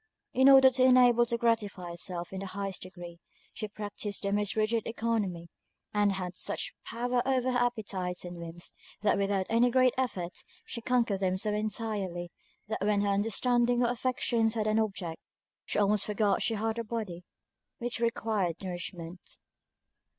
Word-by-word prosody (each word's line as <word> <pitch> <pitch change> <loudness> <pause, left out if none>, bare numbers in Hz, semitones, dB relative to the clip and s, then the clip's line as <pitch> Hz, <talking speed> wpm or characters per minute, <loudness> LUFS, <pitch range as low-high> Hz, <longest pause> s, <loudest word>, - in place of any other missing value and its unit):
In 265 +1 +6
order 265 -1 +8
to 255 0 0
be 255 - +7
enabled 245 -2 +5
to 235 - +1
gratify 210 -7 0
herself 175 +1 -4
in 190 - -4
the 195 - -5
highest 195 0 -4
degree, 175 -2 -9 0.3
she 215 - -4
practiced 205 0 -5
the 200 0 0
most 205 -1 0
rigid 220 +1 +1
oeconomy, 220 -7 -1 0.5
and 205 -1 +3
had 180 -2 -4
such - - -2
power 245 +1 -1
over 255 -1 +1
her 250 - +1
appetites 200 -7 -2
and 175 0 -7
whims, 170 +1 -6 0.3
that 210 - +4
without 195 -1 +1
any 235 +2 +4
great 255 0 +4
effort 180 -9 -2 0.3
she 235 - -5
conquered 235 -5 +1
them 185 -1 +1
so 210 +2 0
entirely, 210 -5 -2 0.4
that 220 -2 -3
when 205 0 +2
her 205 - +1
understanding 240 +4 +2
or 240 - +2
affections 235 -2 0
had 215 -2 0
an 215 +1 +2
object, 195 -6 -3 0.4
she - - -3
almost 205 0 +3
forgot 210 -1 +1
she 225 - +1
had 220 +2 -1
a - - -1
body 210 -6 -5 0.5
which 240 -1 -3
required 220 -6 0
nourishment. 175 -1 -7
210 Hz, 165 wpm, -30 LUFS, 190-235 Hz, 0.5 s, order